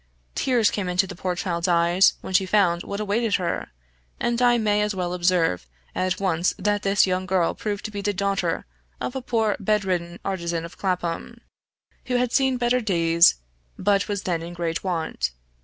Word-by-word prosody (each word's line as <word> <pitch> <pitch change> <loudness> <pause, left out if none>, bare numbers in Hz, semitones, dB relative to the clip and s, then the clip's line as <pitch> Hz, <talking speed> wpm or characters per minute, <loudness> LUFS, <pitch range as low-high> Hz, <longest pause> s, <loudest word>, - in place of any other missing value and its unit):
Tears 240 -5 +2
came 190 -3 -2
into 180 +2 +2
the 180 - -8
poor 180 0 -2
child's 170 -1 -2
eyes 175 +2 +4
when - - -7
she 190 0 +3
found 180 -4 +3
what 200 +2 -5
awaited 215 +1 0
her, 180 -3 -2 0.5
and 240 0 0
I 240 -1 +5
may 210 -2 +2
as 210 -1 -1
well 180 -1 -2
observe 175 - +1 0.3
at 185 0 -1
once 180 -2 +1
that 205 +1 0
this 200 0 +3
young 185 0 -1
girl 180 -2 +2
proved 205 -2 -4
to 215 - -4
be 205 -1 -4
the 205 +1 0
daughter 195 -3 -1 0.3
of 255 - -4
a 265 - -2
poor 225 -4 0
bed 210 0 +1
ridden 175 -2 -2
artisan 170 -3 -2
of 170 - -11
Clapham, 180 -3 -3 0.7
who 250 - -1
had 245 -1 +1
seen 265 -1 +2
better 245 +1 +1
days, 170 -5 +4 0.4
but 200 +1 +2
was 205 -1 -3
then 170 -3 -1
in 170 +1 -7
great 170 -1 -2
want. 165 - -2
190 Hz, 190 wpm, -24 LUFS, 175-210 Hz, 0.7 s, I